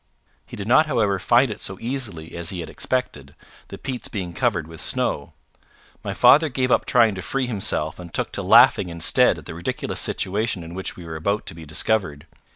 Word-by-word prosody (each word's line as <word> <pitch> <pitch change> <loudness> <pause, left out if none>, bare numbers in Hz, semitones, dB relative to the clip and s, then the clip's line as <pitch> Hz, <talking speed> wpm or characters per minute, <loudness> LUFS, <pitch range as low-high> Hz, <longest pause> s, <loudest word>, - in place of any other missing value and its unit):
He - - -10
did 100 0 -6
not 155 +6 +5
however 105 -8 +1
find 120 +5 +3
it 105 - -8
so 95 - -3
easily 115 -11 -4
as 85 0 -2
he 90 -3 -4
had 80 - -8
expected, 75 - -3 0.3
the - - -9
peats 130 -3 -5
being 90 -5 -5
covered 105 - 0
with 80 -1 -8
snow. - - 0 0.7
My - - -4
father 155 +2 +5
gave 130 -1 -1
up - - +2
trying 115 -4 +4
to 95 - -6
free 135 +8 -2
himself 100 -9 -2
and 85 -1 -10
took - - -3
to - - -3
laughing 90 - +5
instead 85 -1 +4
at - - -12
the - - -7
ridiculous 85 +1 -4
situation 100 -1 -1
in 85 +1 -10
which 95 +1 -5
we 90 - -11
were 80 -1 -6
about 100 +7 -2
to - - -6
be 80 -1 -11
discovered. 80 -2 -1
95 Hz, 205 wpm, -22 LUFS, 85-120 Hz, 0.7 s, not